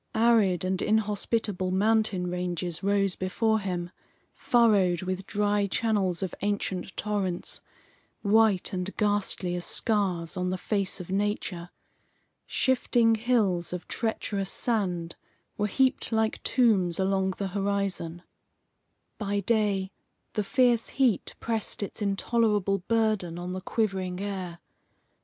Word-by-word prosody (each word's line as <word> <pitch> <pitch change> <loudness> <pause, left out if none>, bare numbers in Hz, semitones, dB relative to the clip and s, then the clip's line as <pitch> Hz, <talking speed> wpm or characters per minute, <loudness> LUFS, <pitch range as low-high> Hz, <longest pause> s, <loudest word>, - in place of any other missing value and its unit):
Arid 220 -6 +3
and 185 0 -1
inhospitable 210 -2 0
mountain 205 -1 +2
ranges 175 -1 -3
rose 195 -1 +1
before 220 +4 0
him, 180 -3 -3 0.4
furrowed 200 -7 +3
with 185 +1 -4
dry 205 0 +1
channels 195 -4 0
of 190 - -3
ancient 200 -2 -2
torrents, 200 -4 -2 0.6
white 210 -3 +3
and 185 +1 -3
ghastly 205 -3 +1
as 175 0 -3
scars 190 -8 +1
on 180 0 -1
the 185 - -1
face 200 0 -1
of 180 0 -7
nature. 195 -3 -2 0.8
Shifting 240 -3 +2
hills 215 -7 +1
of 180 -1 -6
treacherous 205 -4 -1
sand 180 -8 -1 0.4
were 210 - 0
heaped 260 +5 +1
like 220 -1 0
tombs 200 -9 +2
along 190 -1 +1
the 195 -1 -2
horizon. 195 -3 -1 1.0
By 205 -1 -1
day, 200 -3 +1 0.4
the 210 - 0
fierce 240 +1 +2
heat 250 -8 +1
pressed 225 -2 -2
its 200 - -6
intolerable 205 -1 +1
burden 215 -7 +1
on 175 +1 -5
the 185 - -4
quivering 190 -4 -1
air. 185 -4 -5
200 Hz, 120 wpm, -27 LUFS, 185-220 Hz, 1.0 s, Arid